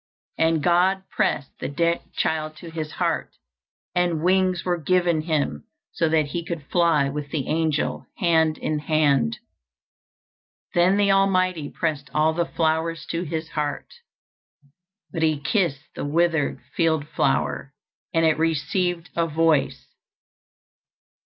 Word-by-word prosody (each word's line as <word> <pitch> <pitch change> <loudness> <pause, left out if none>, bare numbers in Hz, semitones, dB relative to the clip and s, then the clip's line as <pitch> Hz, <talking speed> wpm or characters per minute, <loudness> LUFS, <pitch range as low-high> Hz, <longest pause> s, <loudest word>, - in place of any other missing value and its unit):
And 160 -2 +2
God 185 +2 +3
pressed 140 - 0
the - - -3
dead 170 +4 +1
child 155 -1 -1
to 165 +2 -10
His 155 -2 -5
heart, - - -1 0.6
and 175 -3 +1
wings 185 -1 +2
were 175 -1 0
given 175 -1 +2
him 150 - -1 0.3
so 165 - 0
that 155 -2 +2
he 170 +3 -3
could 165 -2 -5
fly 165 -5 +3
with 145 +1 -5
the 145 -4 -3
angel, 160 -1 -1
hand 160 -6 +2
in 155 -1 -2
hand. 145 - +2 1.4
Then 180 +3 +4
the 200 -1 +3
Almighty 185 -5 +2
pressed 150 -3 -3
all 155 +1 +3
the 170 +1 0
flowers 165 0 -1
to 165 - -1
His 160 -1 -4
heart; 150 -2 -3 1.2
but 165 - -3
He 155 -2 +2
kissed 150 -4 -1
the - - -5
withered 160 +1 +1 0.2
field 160 -3 +1
flower, 70 - 0 0.4
and 165 0 +2
it 160 -1 +2
received 170 +2 0
a 170 -1 +1
voice. 160 -2 +1
160 Hz, 130 wpm, -24 LUFS, 150-175 Hz, 1.4 s, Then